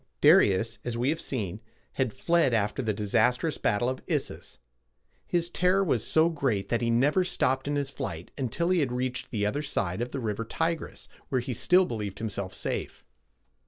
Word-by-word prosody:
Darius, 105 - +4
as 120 -1 -3
we 125 +3 +1
have 160 +2 -1
seen, 105 -7 -3 0.3
had 130 -4 0
fled 150 -2 +2
after 105 +4 0
the 110 -3 0
disastrous 120 +8 +1
battle 110 +4 +1
of 130 0 -2
Issus. - - -3 0.7
His 170 -1 +1
terror 185 +2 +3
was 125 - +1
so 160 +1 +4
great 135 -12 -1
that 120 - +1
he 115 - +1
never 140 +10 +3
stopped 135 -7 0
in 145 - 0
his 140 -1 -2
flight 85 -9 -6
until 140 +6 -1
he 185 - +3
had 140 -5 0
reached 125 +1 -3
the 105 -4 -1
other 125 +8 -1
side 100 -9 -2
of 120 - -2
the 135 - -4
river 110 -2 -2
Ti´gris, 165 +8 -3 0.2
where 130 - +1
he 125 +1 -3
still 180 - +4
believed 105 - -4
himself 100 -4 -3
safe. - - -4
125 Hz, 185 wpm, -28 LUFS, 110-150 Hz, 0.7 s, Darius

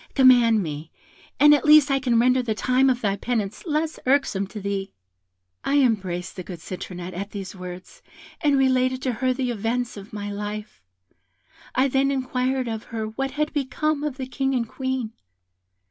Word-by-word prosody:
Command 245 -5 +6
me, 155 0 -6 0.5
and 295 0 +8
at 290 - +3
least 300 -2 +7
I 275 - +3
can 250 -3 +1
render 255 +2 +4
the 225 -3 -2
time 255 +4 +3
of 250 -1 0
thy 200 -2 +1
penance 215 - -3
less 310 +1 -1
irksome 255 -8 +2
to 210 - -8
thee.' 200 -1 -3 0.7
"I 285 - +2
embraced 190 -9 0
the 185 - -5
good 180 0 -8
Citronette 180 +1 -7
at 200 +3 -5
these 195 -2 -7
words, 180 0 -9 0.4
and 290 -3 +3
related 260 -1 +2
to 260 - +1
her 255 +3 0
the 255 -1 -1
events 235 +2 -2
of 200 +1 -10
my 205 -1 -5
life. 210 - -6 0.9
I 260 +2 +4
then 270 +1 +2
inquired 260 -1 -1
of 225 -1 -4
her 220 -2 -4
what 270 +5 -3
had 300 0 0
become 295 +2 -1
of 295 -4 -3
the 265 - -4
King 270 +1 -1
and 235 -2 0
Queen. 260 -3 -3
245 Hz, 175 wpm, -24 LUFS, 205-270 Hz, 0.9 s, and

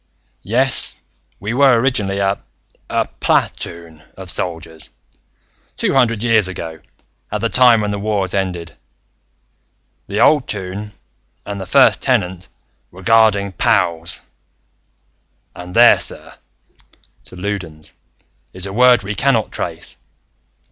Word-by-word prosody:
"Yes, 125 +5 +1 0.4
we 105 +3 -4
were 130 -2 +4
originally 105 -6 0
a... 100 0 0 0.5
a - - 0
pla - - +2
toon 85 -2 -8 0.2
of 95 -2 -7
soldiers, 80 -2 -6 0.9
two - - 0
hundred 115 -5 +2
years 110 -4 +3
ago, 80 -3 -7 0.5
at 105 - -2
the 115 +2 -1
time 120 -3 +5
when 105 -1 -2
the 100 - -3
Wars 100 -3 -2
ended. 90 -4 -3 1.3
The - - -3
old 145 -5 +4
Toon, 100 +1 -6 0.5
and 100 -1 -5
the 95 - -7
First - - +4
Tenant, 90 +1 -1 0.4
were 90 +2 -14
guarding 105 -2 +3
POWs, 90 -7 0 1.3
and 90 +1 -9
there, - - +7
sir," - - -6 0.9
to - - -13
Loudons 90 -5 -6 0.6
"is 95 0 -3
a 95 - -6
word 125 -1 +5
we 100 +2 -4
cannot 115 0 +1
trace. - - -6
100 Hz, 120 wpm, -18 LUFS, 90-115 Hz, 1.3 s, there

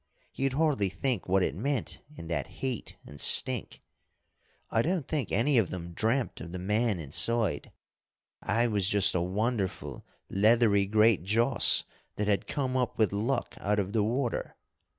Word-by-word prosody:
You'd 135 -1 -1
hardly 140 -9 +1
think 120 -1 -2
what 95 0 +3
it - - -1
meant 140 -4 -3
in 85 - -9
that 85 +1 -3
heat 120 +6 -5
and 70 - -9
stink. 125 -4 +3 0.9
I 115 - +2
don't 165 -1 -1
think 145 -9 -2
any 120 +5 +3
of 100 - 0
them 85 -1 -7
dreamt 115 +7 -1
of 85 - -8
the 90 - -5
man 105 +3 0
inside. 85 - 0 0.7
I 115 +2 +1
was 100 -5 +1
just 100 -1 +3
a 90 - 0
wonderful 100 +2 -3 0.2
leathery 105 -1 +3
great 110 0 +3
joss 115 +7 +3 0.3
that 105 - -2
had 100 -2 0
come 130 -3 -2
up 125 -2 -1
with 110 -2 +2
luck 120 +5 -1
out 105 +1 0
of 100 0 -2
the 110 - +2
water. 120 +3 -2
110 Hz, 160 wpm, -28 LUFS, 95-125 Hz, 0.9 s, what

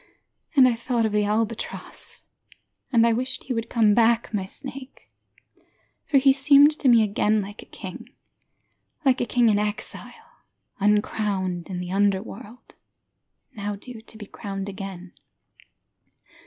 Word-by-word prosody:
And 265 -3 +7
I 250 - +3
thought 235 0 -1
of 220 - 0
the 210 0 +1
albatross, 215 +2 -3 0.7
And 230 -3 +5
I 230 - +3
wished 255 +2 -3
he 260 - -3
would 230 -1 -3
come 220 -3 +3
back, 230 +1 +2
my 195 -3 -1
snake. 265 +5 -10 1.0
For 285 - +3
he 270 0 +5
seemed 280 +2 +6
to 275 - +1
me 230 -2 +6
again 210 +1 +1
like 205 +1 -7
a - - -15
king, - - -9 1.0
Like 260 -2 +3
a 240 - -1
king 240 -1 +3
in 205 -2 +3
exile, 210 0 -5 0.4
uncrowned 200 -3 0
in 185 - -4
the 180 0 -5
underworld, 205 +4 -2 0.8
Now 205 -1 -4
due 225 +2 -10
to 220 -1 -10
be 210 - -8
crowned 195 0 -6
again. 190 -2 -8
220 Hz, 140 wpm, -24 LUFS, 205-245 Hz, 1.0 s, And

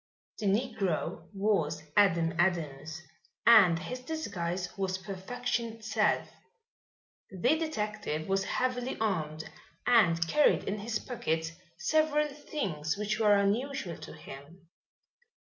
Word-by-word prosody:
The 210 - -1
negro 195 -7 -1
was 195 -7 0
Adam 170 -5 +4
Adams 160 -2 -1 0.4
and 195 -8 +8
his 250 +9 -5
disguise 190 - -4
was 190 -2 -1
perfection 225 +5 -3
itself. 220 -1 0 1.0
The 215 - +2
detective 210 - -3
was 195 0 +1
heavily 255 +2 -1
armed 160 -8 -1 0.4
and 175 -9 +4
carried 300 - +4
in 205 +2 -3
his 220 +2 -2
pockets 165 -11 -2 0.3
several 305 -1 +2
things 200 - -3
which 210 +1 -1
were 210 -2 +5
unusual 205 - 0
to - - -10
him. 155 +3 -12
200 Hz, 110 wpm, -30 LUFS, 170-240 Hz, 1.0 s, and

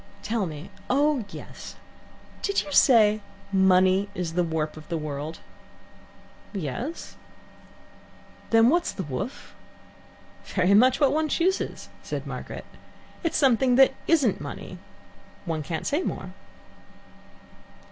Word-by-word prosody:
Tell 215 -3 -1
me; 155 +4 -8 0.2
oh 280 -2 +2
yes; - - -10 0.7
did 400 - 0
you 295 - -9
say 215 -7 +5 0.3
money 190 +1 +4
is 175 -2 -3
the 180 +1 +2
warp 160 -2 -2
of 155 +1 -12
the 170 - -1
world?" 150 +1 -5 1.1
"Yes." 200 - -5 1.3
"Then 225 +1 +6
what's 340 +4 +2
the 190 - -5
woof?" 145 - -6 0.9
"Very 185 0 +1
much 250 +5 +5
what 285 -2 +4
one 310 0 +1
chooses," 365 +4 -1
said - - -5
Margaret. - - -7 0.6
"It's 330 - 0
something 260 -2 +4
that 265 +1 +6
isn't 290 - +3
money - - -7 0.7
one 165 -3 -2
can't 160 +1 -4
say 295 +5 +1
more." - - -5
210 Hz, 115 wpm, -26 LUFS, 170-270 Hz, 1.3 s, Then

